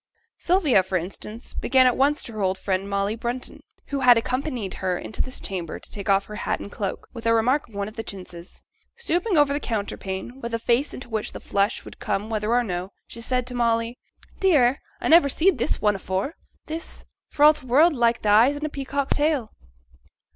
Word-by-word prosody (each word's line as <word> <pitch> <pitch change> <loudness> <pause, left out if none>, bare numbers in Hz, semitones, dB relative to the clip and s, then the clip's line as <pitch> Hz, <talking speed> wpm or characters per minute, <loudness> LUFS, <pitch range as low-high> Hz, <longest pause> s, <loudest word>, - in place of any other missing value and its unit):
Sylvia, 335 - +3
for 185 0 -1
instance, 200 +6 -7
began 260 0 +3
at 250 - +4
once 290 +3 +2
to 230 - -8
her 215 - -4
old 190 0 +1
friend, 195 0 -2
Molly 200 +2 0
Brunton, 240 +2 -5 0.3
who 280 - -1
had 250 -2 +7
accompanied 250 -3 -2
her 185 -1 0
into 220 - -5
this 255 - -4
chamber 180 -5 -5
to - - -12
take 200 -1 -6
off 195 0 +3
her 210 - -8
hat - - -2
and 200 - -8
cloak, 200 -2 -4
with 230 -2 -5
a 230 - +4
remark 250 +6 +1
on 215 - -16
one 200 0 -2
of 215 - -10
the - - -1
chintzes. 180 -3 -10 0.3
Stooping 360 -3 0
over 290 -1 +4
the 290 - -1
counterpane, 210 +1 -4
with 235 0 -3
a - - +1
face 240 +5 0
into 255 - -7
which 220 -2 -3
the - - -7
flush 200 +3 0
would - - -11
come 210 +3 -2
whether 215 -1 -1
or 245 +1 +3
no, 180 -3 -4 0.2
she 230 - -10
said 250 +1 0
to 250 - -6
Molly, 230 0 0 0.4
'Dear! 280 -9 +4 0.2
I - - -2
never 320 -3 +6
seed 325 +1 +2
this 225 - -1
one 210 -1 +3
afore 190 - -2 0.3
this 320 +1 -7 0.2
for 290 - 0
all 305 +1 +9
t' 280 -4 -4
world 305 +7 +5
like 235 -3 +1
th' - - -8
eyes 225 +7 +5
in 295 +1 -4
a - - -2
peacock's 280 -1 -1
tail.' 290 -7 +1
235 Hz, 215 wpm, -24 LUFS, 200-275 Hz, 0.4 s, all